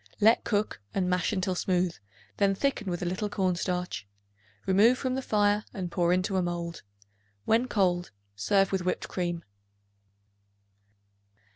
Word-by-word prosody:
Let 220 +2 +5
cook 205 - -1
and 185 -2 +1
mash 180 +2 +1
until 185 -2 0
smooth; 180 -1 +1 0.4
then 200 -1 +3
thicken 215 -4 -1
with 175 0 -2
a - - -1
little 185 +4 -2
cornstarch. 180 - -1 0.6
Remove 210 +6 +5
from 260 -1 -1
the 265 - -1
fire 210 -3 +2
and 180 -3 -4
pour 175 0 +2
into 185 +2 +1
a - - +3
mold. 170 -1 -3 0.6
When 230 +3 +3
cold, 180 -6 +1 0.3
serve 195 - +2
with 190 -1 0
whipped 180 - -1
cream. 175 -2 -3
185 Hz, 140 wpm, -28 LUFS, 175-205 Hz, 0.6 s, Let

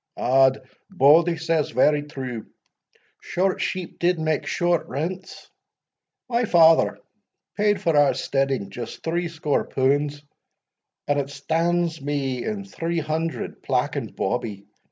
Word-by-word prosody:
"Odd, 130 0 +3 0.2
Bauldie 170 -1 +4
says 165 -2 0
very 145 +5 +3
true, 130 -6 -6 0.7
short 190 +1 -1
sheep 185 -2 -4
did 175 0 +2
make 155 -2 -1
short 175 -1 0
rents 175 +8 -5 0.8
my 240 -1 +1
father 165 -4 +5 0.6
paid 205 0 +2
for 165 -2 +1
our 145 -1 +4
steading 135 -7 -1
just 120 +4 -7
threescore 165 -3 -1
punds, 145 +2 0 0.8
and 145 0 +2
it 140 -1 -3
stands 165 +3 -1
me 135 -3 -2
in 205 -2 -4
three 170 -3 -3
hundred, 160 +1 -3
plack - - 0
and - - -5
bawbee. 100 -3 -3
155 Hz, 120 wpm, -23 LUFS, 140-170 Hz, 0.8 s, father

